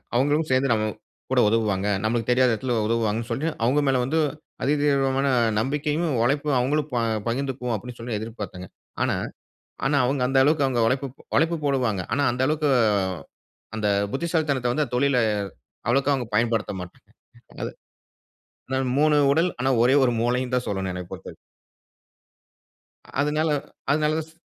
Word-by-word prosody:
அவங்களும் 145 Hz, +5 st, +2 dB
சேர்ந்து 130 Hz, 0 st, +2 dB
நம்ம 110 Hz, -1 st, 0 dB, 0.5 s
கூட -, -, +3 dB
உதவுவாங்க, 105 Hz, -3 st, +1 dB, 0.2 s
நம்மளுக்கு 115 Hz, +1 st, -1 dB
தெரியாத 125 Hz, 0 st, +4 dB
இடத்தில 120 Hz, +2 st, -1 dB
உதவுவாங்கன்னு 115 Hz, 0 st, -1 dB
சொல்லி, 135 Hz, +7 st, -2 dB, 0.2 s
அவங்க 130 Hz, +5 st, +3 dB
மேலே 130 Hz, -2 st, +3 dB
வந்து 150 Hz, +6 st, 0 dB, 0.4 s
அதிதீவிரமான 140 Hz, -1 st, +2 dB, 0.3 s
நம்பிக்கையும் 150 Hz, +7 st, -1 dB, 0.2 s
உழைப்பும் 145 Hz, +2 st, +1 dB
அவங்களும் 145 Hz, +4 st, 0 dB
ப -, -, 0 dB, 0.3 s
பகிர்ந்துக்குவோம். 125 Hz, 0 st, -2 dB
அப்டின்னு 120 Hz, +4 st, -8 dB
சொல்லி 115 Hz, -2 st, -3 dB
எதிர்பார்த்தேங்க. 105 Hz, -5 st, -7 dB, 0.3 s
ஆனா, -, -, +1 dB, 0.7 s
ஆனா 140 Hz, +1 st, +2 dB
அவங்க 135 Hz, +1 st, 0 dB
அந்த 135 Hz, +1 st, +3 dB
அளவுக்கு 145 Hz, 0 st, +3 dB
அவங்க 125 Hz, -3 st, 0 dB
உழைப்பு, 135 Hz, +3 st, 0 dB, 0.3 s
உழைப்பு 165 Hz, +3 st, +2 dB
போடுவாங்க. 125 Hz, -8 st, +1 dB
ஆனா 140 Hz, +3 st, +1 dB
அந்த 125 Hz, +2 st, -1 dB
அளவுக்கு 150 Hz, 0 st, +1 dB, 1.1 s
அந்த 105 Hz, -1 st, -1 dB, 0.3 s
புத்திசாலித்தனத்த 150 Hz, -5 st, 0 dB
வந்து 150 Hz, +4 st, +1 dB
அந்த 125 Hz, -, -8 dB
தொழில்ல 140 Hz, 0 st, +2 dB, 0.7 s
அவ்வளவுக்கா 135 Hz, +3 st, +2 dB
அவங்க 125 Hz, -4 st, -3 dB
பயன்படுத்த 115 Hz, -2 st, +1 dB
மாட்டாங்க. 90 Hz, 0 st, -12 dB, 0.6 s
அது -, -, -5 dB, 1.0 s
ஆனா 130 Hz, -, 0 dB, 0.2 s
3 150 Hz, 0 st, +4 dB, 0.2 s
உடல் 165 Hz, +5 st, +3 dB
ஆனா 130 Hz, -, +1 dB
ஒரே 130 Hz, +3 st, +4 dB
1 125 Hz, -, +3 dB
மூளைன்னு 125 Hz, +1 st, 0 dB
தான் 125 Hz, -, -1 dB
சொல்லணும் 95 Hz, -2 st, -2 dB
என்னைப் 90 Hz, -1 st, -7 dB
பொறுத்தவரைக்கும் -, -, -9 dB, 1.9 s
அதனால 150 Hz, +2 st, +1 dB, 0.4 s
அதனாலதான் 155 Hz, +1 st, +1 dB
ச 160 Hz, -, -23 dB
130 Hz, 140 wpm, -24 LUFS, 115-145 Hz, 1.9 s, தெரியாத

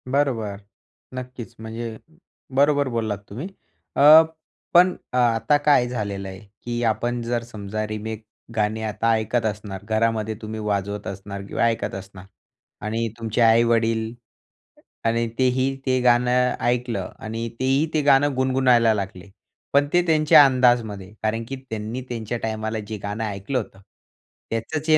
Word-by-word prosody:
बरोबर. 125 Hz, -7 st, 0 dB, 0.6 s
नक्कीच. 125 Hz, -2 st, -8 dB
म्हणजे 110 Hz, 0 st, -6 dB, 0.6 s
बरोबर 145 Hz, 0 st, +3 dB
बोललात 110 Hz, -4 st, -2 dB
तुम्ही. 125 Hz, -, -6 dB, 0.5 s
अ, 150 Hz, +3 st, +9 dB, 0.5 s
पण 180 Hz, +1 st, +6 dB, 0.2 s
अ, -, -, +1 dB
आता 120 Hz, +4 st, +3 dB
काय 145 Hz, -5 st, +5 dB
झालेलं 100 Hz, -5 st, -4 dB
आहे, 95 Hz, 0 st, -9 dB, 0.2 s
की 120 Hz, 0 st, -3 dB
आपण 120 Hz, +2 st, 0 dB
जर 120 Hz, 0 st, -2 dB
समजा 110 Hz, -2 st, -5 dB
रिमेक 110 Hz, +1 st, -5 dB, 0.3 s
गाणे 110 Hz, 0 st, 0 dB
आता 110 Hz, +2 st, 0 dB
ऐकत 110 Hz, +2 st, -1 dB
असणार 105 Hz, -2 st, -4 dB
घरामध्ये 110 Hz, 0 st, 0 dB
तुम्ही 110 Hz, 0 st, -5 dB
वाजवत 105 Hz, -1 st, -2 dB
असणार 100 Hz, +1 st, -6 dB
किंवा -, -, -1 dB
ऐकत 115 Hz, -3 st, 0 dB
असणार 95 Hz, -1 st, -10 dB, 0.6 s
आणि 115 Hz, +2 st, -1 dB
तुमचे 115 Hz, +1 st, -1 dB
आई-वडील 115 Hz, 0 st, +3 dB, 0.9 s
आणि 115 Hz, +1 st, +1 dB
तेही 130 Hz, +1 st, +2 dB
ते 130 Hz, -1 st, +2 dB
गाणं 125 Hz, +1 st, +3 dB
ऐकलं 120 Hz, -1 st, -1 dB
आणि 115 Hz, +1 st, -4 dB
तेही 135 Hz, +3 st, +2 dB
ते 155 Hz, -, +2 dB
गाणं 145 Hz, 0 st, +4 dB
गुणगुणायला 130 Hz, -3 st, +3 dB
लागले. 100 Hz, -2 st, -5 dB, 0.4 s
पण 145 Hz, +1 st, +4 dB
ते 175 Hz, -, +5 dB
त्यांच्या 155 Hz, -2 st, +7 dB
अंदाजमध्ये. 120 Hz, -7 st, +2 dB
कारण 110 Hz, +1 st, 0 dB
की 135 Hz, -, -3 dB
त्यांनी 110 Hz, +3 st, -4 dB
त्यांच्या 115 Hz, -1 st, -3 dB
टाईमाला 110 Hz, 0 st, -2 dB
जे 110 Hz, 0 st, -5 dB
गाणं 105 Hz, +2 st, -3 dB
ऐकलं 105 Hz, +4 st, -3 dB
होतं, 105 Hz, -5 st, -5 dB, 0.7 s
त्याचंच 145 Hz, +8 st, -3 dB
हे 155 Hz, -, +7 dB
115 Hz, 140 wpm, -23 LUFS, 110-125 Hz, 0.9 s, अ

